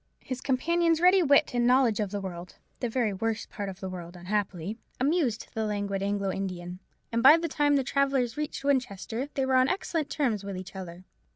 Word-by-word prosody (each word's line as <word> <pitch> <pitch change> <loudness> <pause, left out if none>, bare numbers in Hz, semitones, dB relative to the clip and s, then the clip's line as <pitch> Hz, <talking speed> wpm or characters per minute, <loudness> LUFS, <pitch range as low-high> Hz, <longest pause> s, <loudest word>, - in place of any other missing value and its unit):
His 255 -1 -5
companion's 330 +5 +2
ready 365 +2 +6
wit 285 -5 +4
and 240 0 +2
knowledge 250 -4 +4
of 210 -2 0
the 205 +1 -3
world—the 180 +6 -7
very 230 -3 0
worst 220 +2 -3
part 200 -1 -4
of 190 0 -9
the 190 - -4
world, 175 -1 -7
unhappily—amused 210 - -2
the 220 - -1
languid 200 -2 -2
Anglo 200 -1 -1
Indian: 180 -2 -5 0.3
and 230 0 +1
by 280 +6 +9
the 335 0 -2
time 290 -1 +2
the 275 - +2
travellers 270 -3 +1
reached 300 -2 -4
Winchester, 255 -2 -1
they 270 - +1
were 265 - 0
on 255 +1 +4
excellent 330 -5 -2
terms 235 -9 0
with 195 -1 -5
each 185 +1 -9
other. 180 -1 -8
230 Hz, 190 wpm, -28 LUFS, 195-275 Hz, 0.3 s, by